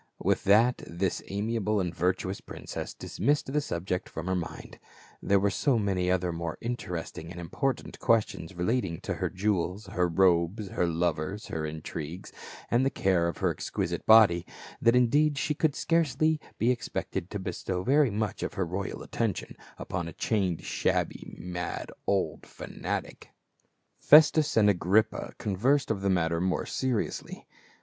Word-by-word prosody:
With - - 0
that 115 +5 +4
this 85 +2 -2
amiable 105 +1 -1
and 90 -3 -1
virtuous 90 +2 -1
princess - - -7
dismissed 145 -1 -1
the 150 - +2
subject 90 -5 -3
from 80 - -6
her 95 - 0
mind; 85 -2 -6 0.4
there 100 0 +3
were 100 +1 +2
so 125 +7 +2
many 95 -4 0
other 90 -1 +1
more 85 -1 -4
interesting 90 -8 -5
and 85 0 -8
important 110 +10 -3
questions 100 -6 +1
relating 90 -2 -1
to - - -3
her - - -2
jewels, 95 0 -1
her 95 -3 0
robes, 90 +3 +2
her 90 - 0
lovers, 85 +4 -1
her 80 -1 -2
intrigues, 80 +2 -6 0.4
and 120 +2 +4
the 135 - +3
care 95 -8 +1
of 85 - -3
her - - +1
exquisite - - -3
body, 105 -6 +7 0.4
that 115 +1 +5
indeed 145 +5 +3
she 150 - 0
could 150 -1 +1
scarcely 155 -1 +2 0.2
be 120 +3 +3
expected 115 -6 -3
to 105 - -4
bestow 90 -1 -3
very 140 +4 +4
much 105 -1 -2
of - - -3
her 95 -3 0
royal 95 +3 -4
attention - - -3 0.2
upon 85 -1 -4
a 85 - -7
chained, 95 -7 -1
shabby, - - -1
mad 90 0 -5 0.2
old - - 0
fanatic. - - -5 0.7
Festus 155 -1 +6
and 105 -2 +6
Agrippa 105 +3 +2
conversed 120 +8 +1
of 100 -3 -2
the 100 - +1
matter 85 -2 +1
more 90 0 0
seriously. 130 -5 -2
95 Hz, 155 wpm, -28 LUFS, 90-115 Hz, 0.7 s, body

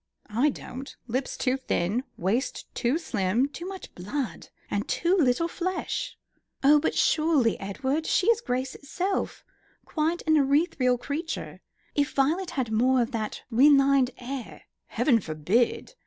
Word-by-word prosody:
I 255 +7 +3
don't. 265 -1 -8
Lips 255 +3 -3
too 255 0 +1
thin; 220 -2 -1
waist 210 +9 -1
too 245 +5 +1
slim; 230 - 0
too 340 +5 -7
much 385 -1 -8
blood, 225 +8 -4 0.2
and 205 +1 -2
too 345 +2 +2
little 305 -1 +2
flesh." 370 +8 -3 0.5
"Oh, 295 +2 +7
but - - -1
surely, 305 -8 +3
Edward, 265 +11 -2
she 360 - +2
is 460 +1 +4
grace 255 - -2
itself; 370 +7 -3 0.4
quite 320 +2 -1
an 315 0 +4
ethereal 275 -3 +2
creature. 300 +7 -5 0.3
If 290 -1 0
Violet 320 +7 +1
had 245 -4 -1
more 250 +3 +3
of 235 - -5
that 220 -3 -4
refined 275 +1 +5
air 255 0 -7
" - - -57
"Heaven 245 -6 +4
forbid. 185 - 0
270 Hz, 140 wpm, -27 LUFS, 240-315 Hz, 0.5 s, Oh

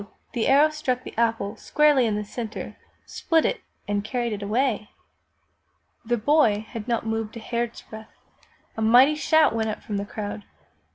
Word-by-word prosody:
the 235 -3 0
arrow 290 +3 +5
struck 260 -5 -2
the - - -9
apple 225 -3 0
squarely 295 -5 +3
in 215 - 0
the 210 - -2
center, 220 +1 -6 0.3
split 325 -1 0
it, - - -1 0.3
and 205 0 -1
carried 235 0 -2
it 205 - -5
away! 215 0 -1 1.1
The 240 +1 0
boy 220 -4 +2
had 225 -2 -7
not 235 -2 -1
moved 225 0 -3
a - - -6
hairsbreadth! 230 -1 -5 0.7
A 220 - -4
mighty 245 +6 +6
shout 315 -1 +3
went 220 -1 -1
up 215 - -5
from 205 - -4
the 200 - -3
crowd 205 0 -6
230 Hz, 165 wpm, -24 LUFS, 215-260 Hz, 1.1 s, mighty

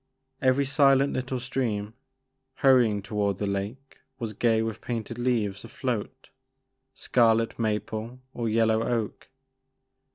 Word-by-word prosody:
Every 130 +1 +3
silent 140 -1 +4
little 130 0 -2
stream, 115 -5 -2 0.7
hurry 130 -4 +6
ing 105 -2 -3
toward 100 -2 -1
the 105 - -2
lake 100 +8 -4 0.2
was 115 -2 -4
gay 110 +1 +2
with 110 -1 -4
painted 115 0 -4
leaves 110 -5 0
afloat, 125 +1 -4 0.7
scarlet 115 -2 +2
maple 110 +2 -2
or 115 -2 -2
yellow 110 0 +3
oak. 115 -3 -2
115 Hz, 120 wpm, -27 LUFS, 105-130 Hz, 0.7 s, hurry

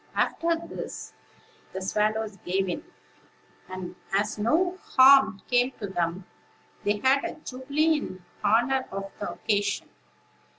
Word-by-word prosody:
After 335 0 +1
this - - -7 0.6
the 190 - -3
swallows 210 +2 0
gave 190 +1 -1
in; 285 - -3 0.9
and, 185 -1 -6 0.2
as 205 +2 0
no 355 - +1 0.2
harm 260 -7 +7
came 245 +1 +2
to 210 - -3
them, 175 -1 -2 0.6
they 205 +1 +1
had 265 +5 +3
a - - -4
jubilee 300 +3 0
in 185 -8 -8 0.2
honor 240 +5 +3
of 195 0 -5
the 205 - -3
occasion. 205 -2 -1
215 Hz, 125 wpm, -27 LUFS, 195-265 Hz, 0.9 s, harm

